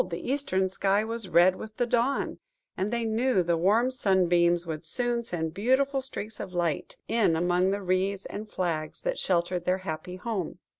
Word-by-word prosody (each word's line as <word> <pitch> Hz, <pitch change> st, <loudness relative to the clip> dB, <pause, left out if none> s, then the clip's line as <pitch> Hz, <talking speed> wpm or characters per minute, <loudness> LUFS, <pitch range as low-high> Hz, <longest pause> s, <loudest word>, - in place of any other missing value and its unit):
the 170 Hz, +9 st, -4 dB
eastern 190 Hz, -10 st, 0 dB
sky 195 Hz, +2 st, +1 dB
was 225 Hz, -3 st, -3 dB
red 175 Hz, +2 st, +5 dB
with 215 Hz, +2 st, -9 dB
the 245 Hz, -, +2 dB
dawn, 245 Hz, +3 st, 0 dB, 0.4 s
and 190 Hz, +3 st, -1 dB
they 235 Hz, -1 st, -1 dB
knew 225 Hz, -2 st, +2 dB
the 170 Hz, 0 st, +1 dB
warm 210 Hz, +9 st, +3 dB
sunbeams 175 Hz, -6 st, +2 dB
would 160 Hz, -1 st, -5 dB
soon 240 Hz, +7 st, -1 dB
send 160 Hz, -7 st, -3 dB
beautiful 265 Hz, +7 st, +2 dB
streaks 220 Hz, -5 st, -6 dB
of 185 Hz, -, -6 dB
light 170 Hz, -4 st, -1 dB
in 220 Hz, -8 st, +2 dB
among 175 Hz, +2 st, +2 dB
the 200 Hz, +1 st, -2 dB
reeds 190 Hz, +2 st, 0 dB
and 215 Hz, +1 st, -6 dB
flags 160 Hz, -5 st, -3 dB
that -, -, -1 dB
sheltered 175 Hz, -1 st, 0 dB
their 180 Hz, +1 st, +1 dB
happy 180 Hz, 0 st, -5 dB
home. 185 Hz, -4 st, -4 dB
190 Hz, 180 wpm, -28 LUFS, 175-230 Hz, 0.4 s, red